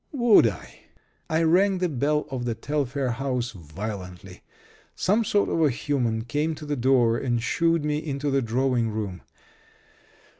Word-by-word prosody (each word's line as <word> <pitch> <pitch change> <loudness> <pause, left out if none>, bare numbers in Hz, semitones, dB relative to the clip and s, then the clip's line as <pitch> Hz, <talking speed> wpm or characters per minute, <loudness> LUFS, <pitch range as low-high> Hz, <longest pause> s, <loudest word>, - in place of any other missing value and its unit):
Would 240 - +5
I? 100 -7 -7 0.5
I 160 +1 +1
rang 185 +4 +3
the 180 0 0
bell 150 +1 0
of 125 -2 -3
the 115 -2 -1
Telfair 135 +1 -2
house 125 0 -2
violently. 95 +1 -8 0.5
Some 210 +5 +2
sort 205 -1 +1
of 165 - 0
a 155 - +4
human 120 -4 -1
came 150 +6 -1
to 150 - -9
the 145 0 -2
door 120 -3 +3
and 120 -2 0
shooed 165 +6 +1
me 150 0 0
into 145 -2 -3
the 135 0 +2
drawing 120 0 0
room. 105 -4 -4
135 Hz, 155 wpm, -25 LUFS, 115-150 Hz, 0.5 s, Would